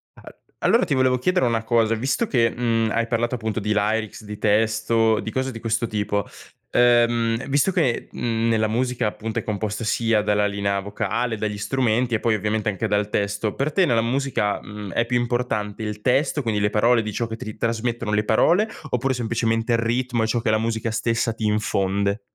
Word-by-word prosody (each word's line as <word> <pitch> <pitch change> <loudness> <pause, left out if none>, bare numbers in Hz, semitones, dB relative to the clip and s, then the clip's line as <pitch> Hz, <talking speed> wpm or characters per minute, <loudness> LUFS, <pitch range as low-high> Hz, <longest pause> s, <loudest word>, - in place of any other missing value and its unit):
Al - - -15 0.2
allora 235 - +4
ti 145 - -1
volevo 130 -1 +2
chiedere 180 +3 +1
una 115 -2 0
cosa, 115 -1 +2
visto 135 - -1
che, 115 -3 +3
mhmm, 115 -2 0
hai 115 0 0
parlato 120 +1 0
appunto 110 -3 -3
di 105 0 -1
lyrics, 110 +1 -1
di 105 -1 -8
testo, 110 +1 +2
di 110 - -5
cose 130 0 -1
di 115 - -7
questo 115 0 -1
tipo, 105 -1 -1 0.5
ehm, 120 0 +3
visto 145 +7 +2
che, 155 -10 0
mhmm, 115 -1 -1
nella 110 -1 +2
musica, 120 0 0
appunto, 110 +1 -4
è - - -9
composta 105 +1 -3
sia 115 -1 +1
dalla 105 0 +2
linea 100 -1 -1
vocale, 110 +4 -2
dagli 105 -1 -3
strumenti 120 +1 0
e 110 - 0
poi 115 -2 +2
ovviamente 105 +1 -1
anche 105 +2 -1
dal 105 0 0
testo; 105 +1 -2
per 140 +3 -1
te 190 - +3
nella 115 -4 +2
musica, 120 -4 -1
mhmm, 105 -3 -8
è 120 - +1
più 120 +1 0
importante 120 -4 -2
il 105 -1 -4
testo, 135 +5 +1
quindi 110 -4 -1
le 105 - +2
parole 115 +3 +3
di 105 -1 -4
ciò 115 - -2
che 110 - -6
ti 110 -1 -7
trasmettono 115 -1 -2
le 105 - +2
parole, 175 - +3 0.2
oppure 130 +2 0
semplicemente 115 -1 0
l - - +2
ritmo 120 0 0
e 110 - 0
ciò 120 - +1
che 115 -1 0
la 110 - +3
musica 115 0 -2
stessa 115 +1 0
ti 110 0 -6
infonde? 100 -1 0
115 Hz, 200 wpm, -23 LUFS, 105-120 Hz, 0.5 s, allora